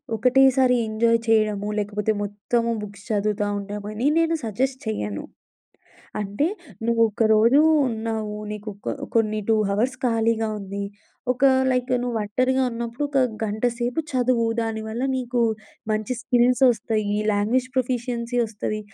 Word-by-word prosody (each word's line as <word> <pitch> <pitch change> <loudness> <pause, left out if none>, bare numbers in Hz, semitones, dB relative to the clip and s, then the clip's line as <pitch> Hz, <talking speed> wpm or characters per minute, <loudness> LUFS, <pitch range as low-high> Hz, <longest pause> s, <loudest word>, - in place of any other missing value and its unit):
ఒకటేసారి 255 +2 +4
ఎంజాయ్ 230 +1 +2
చేయడము, 215 -2 +2
లేకపోతే 210 +1 -1
మొత్తము 210 +3 -1
బుక్స్ 205 -1 -9
చదువుతా 210 0 0
ఉండమని 210 +4 -5
నేను 330 0 +2
సజెస్ట్ 260 +5 -1
చెయ్యను. 105 - -3 1.0
అంటే 205 +9 -1 0.4
నువ్వొకరోజు 230 +2 +4 0.3
ఉన్నావు. 220 -2 -3
నీకు 210 0 -6
ఒక 200 - -4 0.2
కొన్ని 215 -1 +2
2 220 - +4
హావర్స్ 235 +6 0
ఖాళీగా 225 -1 +1
ఉంది. 200 +1 -5 0.5
ఒక 255 - -14 0.3
లైక్ 250 0 0
నువ్వొంటరిగా 245 +3 0
ఉన్నప్పుడు 235 +4 -4
ఒక 275 -1 0 0.3
గంటసేపు 240 +6 -1
చదువు. 245 -2 +2 0.2
దానివల్ల 220 +1 -4
నీకు 245 -1 -1 0.5
మంచి 215 +3 -1
స్కిల్స్ 250 +1 +2
వస్తయి. 215 -2 -1
లాంగ్వేజ్ 235 +5 +1
ప్రొఫిషియన్సీ 245 -1 -1
వస్తది. 215 0 -4
225 Hz, 115 wpm, -23 LUFS, 210-245 Hz, 1.0 s, ఒకటేసారి